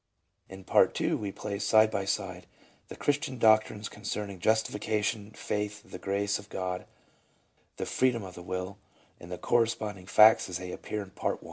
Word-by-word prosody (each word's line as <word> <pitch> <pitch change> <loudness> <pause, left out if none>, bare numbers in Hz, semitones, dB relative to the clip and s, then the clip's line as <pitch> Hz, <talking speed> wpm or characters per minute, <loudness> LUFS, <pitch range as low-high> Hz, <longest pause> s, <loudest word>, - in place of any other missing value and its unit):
In 95 0 -10
Part - - +3
II - - +1
we 100 -2 -2
place, 100 0 -4
side 110 0 +5
by 100 -1 -1
side, 90 -2 -3 0.4
the - - -9
Christian 145 -2 -1
doctrines 110 -2 +3
concerning 100 -3 -5
Justification, 105 0 0
Faith, 105 -1 -4
the - - -9
Grace 100 +1 0
of 100 0 -13
God, 90 -1 -4 0.9
the - - -3
Freedom 125 -4 +1
of 95 -1 -8
the 90 - -10
Will, 90 +3 -5 0.4
and 85 - -11
the 90 - -4
corresponding 110 -5 0
facts 110 +1 +6
as 90 - -3
they 90 0 -6
appear 105 +2 -4
in 95 - -14
Part - - -1
I. - - -23
100 Hz, 170 wpm, -29 LUFS, 95-110 Hz, 0.9 s, facts